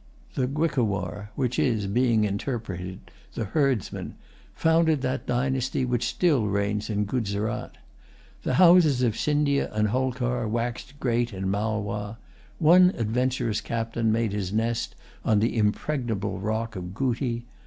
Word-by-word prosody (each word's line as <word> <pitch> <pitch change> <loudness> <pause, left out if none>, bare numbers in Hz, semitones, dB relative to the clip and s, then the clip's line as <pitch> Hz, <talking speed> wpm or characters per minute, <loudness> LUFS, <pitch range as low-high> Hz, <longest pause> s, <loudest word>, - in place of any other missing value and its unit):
The 125 - 0
Guicowar, 105 - -1
which 125 -3 -1
is, 110 -5 +1
being 115 +2 +2
interpreted, 100 -4 -4 0.2
the 110 - -2
Herdsman, 130 - -1 0.4
founded 160 -3 +3
that 130 0 -2
dynasty 130 +1 0
which 125 -1 0
still 145 -12 +2
reigns 100 +2 -1
in 105 -1 0
Guzerat. 105 -2 -2 0.6
The 130 - -1
houses 170 -6 +6
of 115 -3 +2
Scindia 145 0 +1
and 105 0 +1
Holkar 125 -1 -1
waxed 120 +5 -3
great 120 -1 0
in 95 0 -2
Malwa. 105 0 -2 0.4
One 180 +3 +6
adventurous 115 -1 0
captain 115 -1 -1
made 110 -2 0
his 100 -3 -2
nest 115 +2 -1 0.3
on 110 - +3
the 115 +3 +1
impregnable 110 0 -1
rock 110 +2 -2
of 90 0 -6
Gooti. 120 -1 -1
115 Hz, 130 wpm, -26 LUFS, 105-130 Hz, 0.6 s, houses